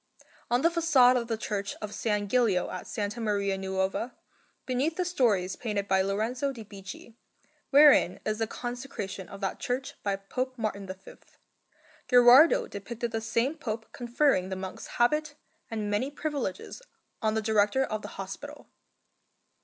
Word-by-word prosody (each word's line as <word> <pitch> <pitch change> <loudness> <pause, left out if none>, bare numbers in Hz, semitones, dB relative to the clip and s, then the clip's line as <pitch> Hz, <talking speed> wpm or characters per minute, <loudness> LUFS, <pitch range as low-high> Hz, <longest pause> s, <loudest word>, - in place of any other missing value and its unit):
On 245 +2 +2
the 335 - +6
façade 305 -7 +5
of 235 -2 -1
the 225 -2 -1
Church 200 -2 -3
of 210 -1 -6
S. - - -7 0.3
Gilio 215 -6 +2
at 185 - -7
S. 210 +2 -2
Maria 205 -3 0
Nuova, 190 +5 -2 0.5
beneath 265 +6 0
the 365 - -1
stories 210 - +1
painted 210 -4 -3
by 190 -1 +3
Lorenzo 220 +8 -1
di 235 -4 -9
Bicci, 200 +2 -10 0.6
wherein 285 - +6
is 215 0 -1
the 225 - 0
consecration 240 -6 -6
of 195 - -10
that 195 - -2
church 255 +2 -3
by 200 -1 0
Pope 255 +7 -4
Martin 205 -3 -3
V, 190 +1 -10 0.9
Gherardo 270 - +7
depicted 230 +3 -5
the 225 - -2
same 230 +5 0
Pope 225 -7 -5
conferring 240 -5 +1
the 190 - -3
monk's 190 0 -7
habit 300 +5 +2 0.3
and 215 -3 -3
many 210 +7 0
privileges 290 - -4 0.4
on 220 -1 +1
the 220 - +1
Director 215 +4 +3
of 215 -4 -3
the - - -7
Hospital. 195 +10 -8
225 Hz, 155 wpm, -28 LUFS, 200-255 Hz, 0.9 s, Gherardo